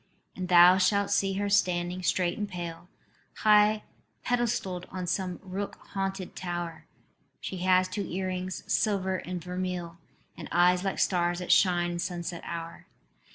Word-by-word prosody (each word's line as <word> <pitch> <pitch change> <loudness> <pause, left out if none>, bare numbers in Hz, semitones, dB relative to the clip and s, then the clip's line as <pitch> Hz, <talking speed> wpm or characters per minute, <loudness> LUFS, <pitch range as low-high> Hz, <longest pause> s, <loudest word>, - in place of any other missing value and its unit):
"And 185 -1 -4
thou 180 +1 +8
shalt 200 +1 +2
see 195 -1 +2
her 205 +1 -1
standing 180 -2 +1
straight 175 -1 +1
and 210 -1 -4
pale, 170 -1 -7 0.5
High 210 0 +5 0.4
pedestalled 225 -7 -1
on 185 -1 -5
some 180 0 -2
rook 195 +1 -5
haunted 195 -1 -4
tower: 175 -2 -5 0.5
She 190 - -5
has 185 0 +3
two 185 0 -4
earrings, 185 0 -3
silver 190 -3 +1
and 180 -1 -6
vermeil, 180 -1 -4 0.4
And - - -9
eyes 180 +1 +4
like 195 -1 -2
stars 175 -1 +1
that 180 0 -2
shine 175 -2 +4
in 175 - -4
sunset 175 -1 -4
hour. 170 0 -7
185 Hz, 145 wpm, -28 LUFS, 175-195 Hz, 0.5 s, thou